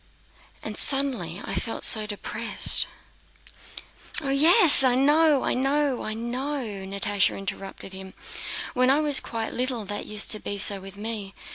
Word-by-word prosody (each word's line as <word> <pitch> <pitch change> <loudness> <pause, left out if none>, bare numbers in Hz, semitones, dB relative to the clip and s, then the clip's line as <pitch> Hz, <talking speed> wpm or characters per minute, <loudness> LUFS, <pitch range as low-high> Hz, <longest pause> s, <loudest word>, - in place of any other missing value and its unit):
and - - -7
suddenly 250 - +1
I - - -6
felt 225 - -5
so 215 -1 +5
depressed..." 215 +2 -3 1.3
"Oh 275 -3 -5
yes, 320 +2 +8
I 255 -2 +2
know, 295 +1 +2
I - - -2
know, 275 0 -2
I 215 - -6
know!" 255 +5 -5 0.2
Natásha 200 0 -1
interrupted 195 0 -8
him. 190 0 -11 0.6
"When 255 +1 0
I 275 +3 +2
was 295 -3 +3
quite 225 -1 -7
little 250 -3 -4
that 205 +1 -6
used 210 0 -1
to 215 - +1
be 205 - -6
so 200 -1 +3
with 195 +1 -13
me. 210 -2 -7
230 Hz, 150 wpm, -23 LUFS, 205-275 Hz, 1.3 s, yes